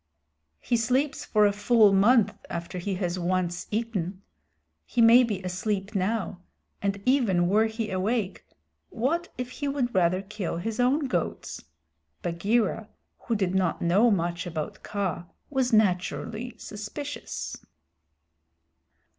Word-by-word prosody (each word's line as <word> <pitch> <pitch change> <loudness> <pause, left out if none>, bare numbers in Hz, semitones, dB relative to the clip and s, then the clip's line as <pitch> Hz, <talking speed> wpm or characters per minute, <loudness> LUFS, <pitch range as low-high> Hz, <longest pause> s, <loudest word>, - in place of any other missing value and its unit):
"He 240 - 0
sleeps 260 +5 0
for 210 -1 +4
a 205 - +4
full 205 0 +4
month 215 +3 +5 0.2
after 170 +2 -5
he 195 +2 -2
has 180 -1 -2
once 175 0 -1
eaten. 200 -4 -3 0.6
He 235 - -4
may 235 +2 +8
be 205 -5 -2
asleep 195 +3 -2
now, 195 -1 -1 0.4
and 200 0 -1
even 220 -10 +3
were 215 +4 +3
he 220 -1 -4
awake 195 +1 -1 0.5
what 335 +9 -1
if 250 0 -4
he 285 +2 -4
would 275 -3 -1
rather 185 +1 +2
kill 195 -4 -4
his 220 +6 -4
own 255 +5 +3
goats?" 260 - -3 0.6
Bagheera, 205 +5 0 0.4
who 230 - +1
did 190 -3 0
not 185 -3 +1
know 195 +8 +4
much 175 -3 0
about 160 -3 -5
Kaa, 190 -4 -3 0.3
was 265 -3 +1
naturally 215 +3 0
suspicious. 215 +8 -6
205 Hz, 130 wpm, -27 LUFS, 185-235 Hz, 0.6 s, may